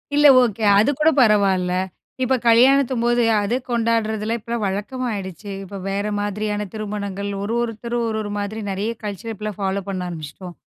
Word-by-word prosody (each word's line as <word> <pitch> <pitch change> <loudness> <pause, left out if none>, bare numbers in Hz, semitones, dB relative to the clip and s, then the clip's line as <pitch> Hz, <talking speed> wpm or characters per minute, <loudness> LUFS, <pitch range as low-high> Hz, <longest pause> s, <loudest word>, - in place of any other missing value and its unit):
இல்ல 295 0 +7 0.2
ஓகே. 225 -2 -2 0.2
அது 220 - +4
கூட 315 +1 +5
பரவால்ல. 195 -5 +3 0.5
இப்ப 260 +1 +2
கல்யாணத்தும்போது 240 0 +4 0.2
அத 205 +4 -1 0.2
கொண்டாடுறதுல 225 -1 0
இப்பல்லாம் 235 0 -4
வழக்கமாயிடுச்சு. 205 -2 -4
இப்ப 195 +1 -8
வேற 200 +1 -1
மாதிரியான 210 0 -2
திருமணங்கள். 200 -2 -4
ஒரு, 220 +3 -2
ஒருத்தர் 235 +1 -4
ஒரு, 220 -1 -2
ஒரு 205 -1 -5
மாதிரி 205 +2 -3
நிறைய 205 +4 -2
கல்ச்சர் 210 +2 -5
இப்பல்லாம் 210 -1 -6
ஃபாலோப் 195 0 -2
பண்ண 180 -2 -3
ஆரம்பிச்சுட்டோம். 170 +2 -8
210 Hz, 145 wpm, -21 LUFS, 200-230 Hz, 0.5 s, இல்ல